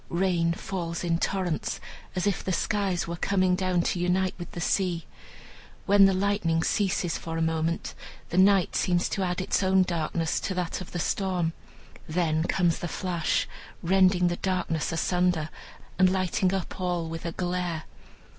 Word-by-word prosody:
Rain 170 Hz, -2 st, +1 dB
falls 170 Hz, -2 st, -4 dB
in 165 Hz, -1 st, +1 dB
torrents, 180 Hz, -5 st, -1 dB, 0.4 s
as 180 Hz, -, 0 dB
if 200 Hz, -2 st, 0 dB
the 190 Hz, -, -2 dB
skies 190 Hz, -1 st, 0 dB
were 170 Hz, -, -3 dB
coming 185 Hz, 0 st, +2 dB
down 180 Hz, -2 st, +1 dB
to 175 Hz, -, -1 dB
unite 180 Hz, +1 st, +1 dB
with 175 Hz, -, -6 dB
the -, -, -5 dB
sea. 175 Hz, -1 st, 0 dB, 0.8 s
When 200 Hz, 0 st, +7 dB
the 195 Hz, -, +4 dB
lightning 185 Hz, -4 st, +1 dB
ceases 190 Hz, -4 st, 0 dB
for 165 Hz, 0 st, -5 dB
a -, -, 0 dB
moment, 160 Hz, +1 st, -1 dB, 0.4 s
the 180 Hz, -, +1 dB
night 195 Hz, -1 st, +4 dB
seems 175 Hz, -1 st, +2 dB
to 200 Hz, -, -2 dB
add 180 Hz, -1 st, -1 dB
its 185 Hz, -, 0 dB
own 190 Hz, 0 st, +4 dB
darkness 165 Hz, -2 st, -1 dB
to 190 Hz, -, -3 dB
that 180 Hz, 0 st, -2 dB
of 185 Hz, -, -8 dB
the -, -, -4 dB
storm; 180 Hz, -2 st, 0 dB, 0.6 s
then 160 Hz, -1 st, +1 dB
comes 175 Hz, -3 st, +1 dB
the 175 Hz, -, -3 dB
flash, 175 Hz, -1 st, -1 dB, 0.4 s
rending 185 Hz, 0 st, +4 dB
the 175 Hz, 0 st, -1 dB
darkness 180 Hz, -5 st, -1 dB
asunder, 175 Hz, -1 st, +1 dB, 0.5 s
and 185 Hz, -1 st, +6 dB
lighting 185 Hz, 0 st, +1 dB
up 190 Hz, -1 st, -3 dB
all 175 Hz, -2 st, -1 dB
with 165 Hz, 0 st, -6 dB
a 170 Hz, -, -3 dB
glare. 175 Hz, -3 st, -2 dB
180 Hz, 165 wpm, -27 LUFS, 170-190 Hz, 0.8 s, When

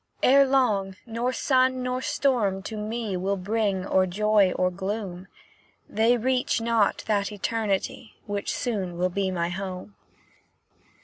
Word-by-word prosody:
Ere 275 Hz, +1 st, +6 dB
long, 210 Hz, -8 st, +1 dB
nor 235 Hz, +2 st, -2 dB
sun 255 Hz, -1 st, +2 dB
nor 250 Hz, 0 st, -2 dB
storm 230 Hz, -9 st, 0 dB
to 220 Hz, -, -6 dB
me 215 Hz, -1 st, -3 dB
Will 195 Hz, +2 st, -1 dB
bring 200 Hz, -1 st, -1 dB
or 185 Hz, -1 st, +2 dB
joy 205 Hz, 0 st, +3 dB
or 180 Hz, 0 st, +1 dB
gloom; 190 Hz, -1 st, -5 dB, 0.6 s
They 230 Hz, +3 st, +2 dB
reach 250 Hz, +1 st, +1 dB
not 225 Hz, -2 st, +1 dB
that 205 Hz, -1 st, 0 dB
Eternity 210 Hz, +1 st, -2 dB
Which 205 Hz, -1 st, -3 dB
soon 195 Hz, -8 st, -3 dB
will 180 Hz, +1 st, +1 dB
be 190 Hz, +1 st, -1 dB
my 170 Hz, -2 st, -1 dB
home." 185 Hz, +2 st, -6 dB
210 Hz, 135 wpm, -26 LUFS, 190-235 Hz, 0.6 s, Ere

